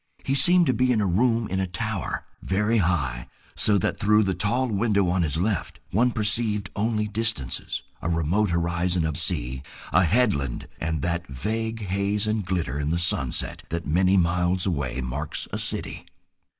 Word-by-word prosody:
He 135 - 0
seemed 175 +5 +5
to 130 - +2
be 125 0 +2
in 115 - +2
a 105 - +1
room 115 +5 +2
in 95 - -2
a 95 - 0
tower, 110 0 -3 0.2
very 105 +4 +1
high, 70 -10 0 0.3
so 105 -1 +4
that 95 - -1
through 105 +1 +4
the 95 -1 0
tall 115 +8 0
window 100 -3 +1
on 90 +1 +1
his 80 -3 0
left 95 +1 -1
one 120 +6 +3
perceived 105 -3 +1
only 105 0 0
distances, 110 - -2 0.2
a 85 - -2
remote 85 +6 +1
horizon 85 0 0
of 80 -2 -2
sea, 65 0 -1 0.3
a 90 +4 +5
headland 80 - +1
and 80 -3 -2
that 85 0 -2
vague 110 - -3
haze 100 +2 0
and 110 -3 -1
glitter 85 -7 -1
in 75 0 -1
the 85 - +1
sunset 85 -7 +1
that 85 0 -3
many 90 +6 +3
miles 90 +1 +1
away 70 -8 -2
marks 70 +5 -3
a - - -2
city. - - -4
95 Hz, 175 wpm, -25 LUFS, 85-110 Hz, 0.3 s, seemed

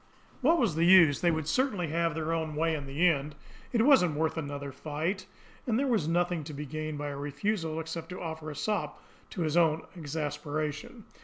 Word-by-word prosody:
What 320 +6 +4
was 230 - +2
the 165 +2 +1
use! 170 -6 +7
They 175 - +4
would 160 -2 -1
certainly 200 - 0
have 165 0 0
their 160 0 -1
own 160 -2 -2
way 165 +1 +1
in 145 -3 -4
the 150 +7 +2
end. 150 -2 0 0.4
It 230 -2 +3
wasn't 230 - +5
worth 160 +1 0
another 145 -3 -4
fight, 160 +7 -3 0.4
and 225 -2 +2
there 275 - +1
was 225 - +1
nothing 175 -1 +1
to 150 -1 -7
be 150 +1 -5
gained 155 +1 -4
by 145 0 -3
a 140 - -5
refusal 155 +4 -2
except 160 0 -6
to 180 - -6
offer 160 -2 -5
a 150 - -7
sop 210 +7 -2 0.3
to 180 - -5
his 155 -1 0
own 165 -2 +3
exasperation. 150 - -4
160 Hz, 205 wpm, -29 LUFS, 150-180 Hz, 0.4 s, use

